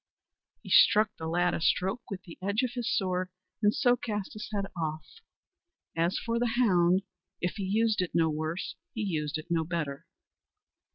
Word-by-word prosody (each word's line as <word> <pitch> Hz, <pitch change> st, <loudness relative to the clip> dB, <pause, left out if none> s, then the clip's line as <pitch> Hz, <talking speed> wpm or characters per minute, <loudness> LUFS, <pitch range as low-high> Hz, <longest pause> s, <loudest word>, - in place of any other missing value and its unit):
He -, -, -9 dB
struck 215 Hz, -1 st, +6 dB
the 160 Hz, -, -5 dB
lad 175 Hz, +2 st, +2 dB
a -, -, -2 dB
stroke 190 Hz, +8 st, +1 dB
with 185 Hz, -2 st, -6 dB
the 170 Hz, -, -12 dB
edge 200 Hz, +6 st, 0 dB
of 250 Hz, -, 0 dB
his 245 Hz, -1 st, -2 dB
sword, 185 Hz, -1 st, 0 dB, 0.3 s
and 210 Hz, -1 st, +5 dB
so 245 Hz, +3 st, +3 dB
cast 210 Hz, -4 st, -4 dB
his 215 Hz, +2 st, -7 dB
head 200 Hz, -2 st, -1 dB
off. 160 Hz, -2 st, -3 dB, 0.9 s
As 170 Hz, +2 st, +1 dB
for 235 Hz, 0 st, -1 dB
the 240 Hz, -1 st, 0 dB
hound, 185 Hz, -5 st, +4 dB, 0.4 s
if 175 Hz, +3 st, -2 dB
he 200 Hz, -, -3 dB
used 215 Hz, +1 st, +2 dB
it 180 Hz, -, -3 dB
no 165 Hz, -1 st, +4 dB
worse, 155 Hz, +3 st, -3 dB, 0.2 s
he 225 Hz, -, -2 dB
used 155 Hz, -5 st, -1 dB
it 155 Hz, +2 st, -9 dB
no 165 Hz, -1 st, +2 dB
better. 155 Hz, -4 st, -4 dB
185 Hz, 180 wpm, -29 LUFS, 165-215 Hz, 0.9 s, struck